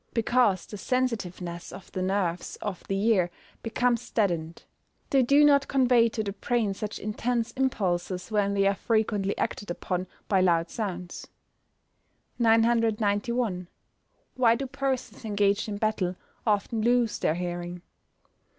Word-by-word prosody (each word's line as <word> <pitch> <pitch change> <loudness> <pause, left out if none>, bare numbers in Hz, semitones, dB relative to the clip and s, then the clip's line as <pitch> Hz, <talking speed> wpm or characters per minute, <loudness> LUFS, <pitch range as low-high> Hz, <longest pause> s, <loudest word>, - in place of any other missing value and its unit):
_ - - -33
Because 230 -5 +2
the 210 - -9
sensitiveness 190 -9 -2
of 185 - -11
the 185 - -3
nerves 185 -2 -1
of 205 -4 -5
the 195 0 -1
ear 200 -5 +3 0.3
becomes 235 +1 0
deadened. 170 -6 -1 0.5
They 270 - +5
do 280 +4 +5
not 280 -1 +5
convey 245 -4 +4
to 220 -1 -3
the 200 - -3
brain 220 0 0
such 210 +2 -5
intense 230 +2 -2
impulses 185 -7 -1
when 200 -1 +1
they 195 0 +3
are 200 - +4
frequently 210 -2 0
acted 205 - -3
upon 180 +1 -3 0.2
by 195 -2 +3
loud 170 -2 +2
sounds. 180 -5 -5 1.1
991. 225 -3 +2 0.7
_Why 235 -2 +4
do 275 - -3
persons 270 -1 -3
engaged 205 0 +1
in 205 - -3
battle 205 -4 0 0.3
often 215 +2 +1
lose 240 -1 +2
their 155 - +1
hearing? 175 0 -4
210 Hz, 135 wpm, -27 LUFS, 185-235 Hz, 1.1 s, They